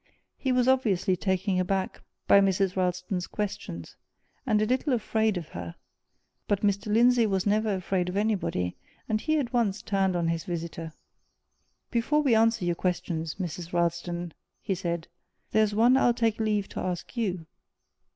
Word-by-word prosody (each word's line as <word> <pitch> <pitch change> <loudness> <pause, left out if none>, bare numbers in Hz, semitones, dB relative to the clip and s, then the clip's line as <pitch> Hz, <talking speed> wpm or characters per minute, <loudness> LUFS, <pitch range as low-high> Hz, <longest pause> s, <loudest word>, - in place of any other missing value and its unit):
He 265 - -1
was 250 0 +2
obviously 215 -8 +2
taken 190 0 0
aback 190 +1 -1 0.3
by 200 - +7
Mrs. 195 -1 +1
Ralston's 180 0 -1
questions, 200 - -5 0.5
and 215 - +3
a 215 - +2
little 255 +4 +1
afraid 220 -3 +1
of 170 -3 -6
her; 85 0 -7 0.7
but 200 -1 +1
Mr. 200 +1 0
Lindsey 240 +1 +5
was 190 -2 0
never 210 0 +2
afraid 185 -1 -1
of 185 - -3
anybody, 200 - 0 0.3
and 215 -1 0
he 310 +3 +1
at 265 -4 -2
once 215 -3 +1
turned 195 -2 +1
on 170 -1 +1
his 165 -1 -1
visitor. 165 -2 -5 1.0
"Before 290 +6 +2
we 265 -5 +3
answer 225 -3 +3
your 175 - +2
questions, 165 -2 -2
Mrs. 175 -2 -5
Ralston," 170 0 -1 0.3
he 200 - -2
said, 170 -3 -3 0.4
"there's 215 -1 +2
one 235 +4 +5
I'll 245 -3 +4
take 225 -2 +1
leave 210 -2 0
to - - -6
ask 180 +5 -4
you. 185 -8 -2
195 Hz, 160 wpm, -27 LUFS, 175-220 Hz, 1.0 s, by